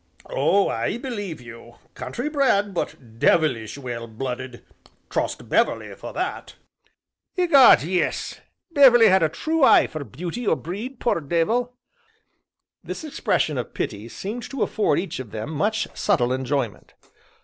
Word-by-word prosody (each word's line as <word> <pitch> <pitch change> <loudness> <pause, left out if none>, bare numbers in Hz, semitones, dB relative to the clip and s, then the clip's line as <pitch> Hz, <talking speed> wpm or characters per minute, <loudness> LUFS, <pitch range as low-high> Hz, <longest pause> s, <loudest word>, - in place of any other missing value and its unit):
"Oh, 200 - +3
I - - -1
believe 205 - -5
you! 120 -1 -12 0.2
Country 130 - -5
bred, 260 -10 +2
but 115 -9 -5
devilish 130 -8 +2
well 120 -4 -6
blooded 125 +2 -6 0.5
trust - - -2
Beverley - - +1
for - - -9
that." - - -4 0.8
"Egad, 330 - +7
yes 180 +3 -2 0.3
Beverley 255 -6 +7
had 190 0 +4
a 160 - +3
true 320 - -1
eye - - +7
for 155 -2 -6
beauty 175 - -6
or - - +4
breed, 210 - -6
poor 200 -8 0
dey 165 +3 +1
vil!" 245 +6 -1 1.1
This - - -6
expression 155 - 0
of 120 - -6
pity 105 +2 -4
seemed 215 - -6
to 270 -4 -1
afford 215 - +1
each 185 -5 -4
of 130 -4 -7
them 110 +8 -5
much 210 +8 0
subtle 130 -12 +1
enjoyment. 130 -3 -3
170 Hz, 140 wpm, -23 LUFS, -, 1.1 s, Egad